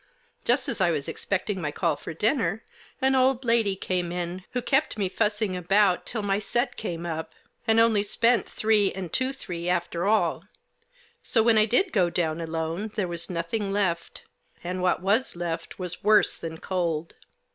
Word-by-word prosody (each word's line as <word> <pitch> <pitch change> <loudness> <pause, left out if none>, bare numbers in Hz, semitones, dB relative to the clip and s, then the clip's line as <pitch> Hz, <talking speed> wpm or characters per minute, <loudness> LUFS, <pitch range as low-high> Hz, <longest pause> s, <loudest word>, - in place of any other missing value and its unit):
Just 250 +2 +2
as - - -2
I - - +4
was 150 -4 -1
expecting 200 0 -2
my 150 - -1
call 165 -1 0
for 145 - -8
dinner 220 - 0 0.4
an 265 0 +4
old 260 0 +3
lady 230 -4 +2
came 180 -2 -2
in 175 +1 -4
who 250 - +1
kept 270 +1 +1
me 200 -2 +1
fussing 210 +1 0
about 185 +1 +2
till 220 -3 -3
my 200 0 +1
set 240 +5 -1
came 175 -5 -4
up 160 -1 -4
— 240 - -38
and 225 0 +5
only 225 -2 +4
spent 230 +1 +2
three 215 -2 +2
and 185 -4 -6
two 260 +1 +1
three 175 -10 -5
after 175 0 0
all; 220 +1 +2 0.8
so 225 - +2
when 225 -1 +5
I 215 - +5
did 305 - +1
go 185 -6 +3
down 170 -1 -1
alone 165 +5 -3
there 200 -4 0
was 170 -1 -4
nothing 190 +4 -2
left; 190 -4 -1 0.4
and 180 +1 -3
what 180 0 +1
was 210 +5 +1
left 170 -1 -4
was 180 -2 -5
worse 210 +1 +4
than 160 -1 -6
cold. 170 -3 -2
190 Hz, 180 wpm, -26 LUFS, 170-220 Hz, 0.8 s, and